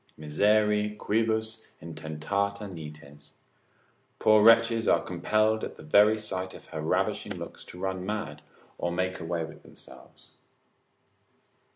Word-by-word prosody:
Miseri 105 +6 +2
quibus 110 +1 -1 0.2
intentata 85 +6 -3
nites, 75 -4 -11 0.8
poor 110 -1 +5
wretches 115 +1 +5
are - - +4
compelled 110 +5 +1
at - - -5
the - - -12
very 105 +8 +5
sight 95 -3 -4
of - - -13
her 80 -2 -5
ravishing 80 - -1
looks - - -8
to 90 - -12
run 95 -1 -3
mad, 95 -7 -4 0.4
or 85 - -1
make 95 +1 -2
away 85 -1 -2
with 80 - -13
themselves. - - -16
95 Hz, 120 wpm, -28 LUFS, 80-110 Hz, 0.8 s, poor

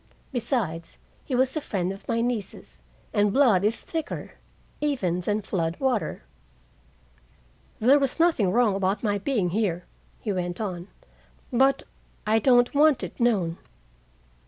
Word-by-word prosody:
Besides, 225 - -2 0.3
he 260 - -2
was 260 +2 +2
a 310 - -1
friend 190 -8 -2
of 195 - -13
my 230 0 0
niece's, 235 -5 -4 0.3
and 205 -1 +3
blood 230 -7 +4
is 215 +3 0
thicker 320 -3 -5 0.5
even 225 - 0
than 210 +3 -1
flood 170 -3 -2
water. 255 - -1 1.6
"There 265 +6 +5
was 275 +2 -1
nothing 320 - +3
wrong 230 -1 +3
about 195 +2 -1
my 205 -2 +1
being 200 -5 0
here," 185 -4 -1 0.3
he 210 - -2
went 175 -1 -3
on, 185 -4 -4 0.7
"but 270 +3 +3 0.4
I 220 +1 +3
don't 245 0 +4
want 295 -1 +4
it - - -7
known. 195 -9 +1
215 Hz, 135 wpm, -26 LUFS, 190-255 Hz, 1.6 s, There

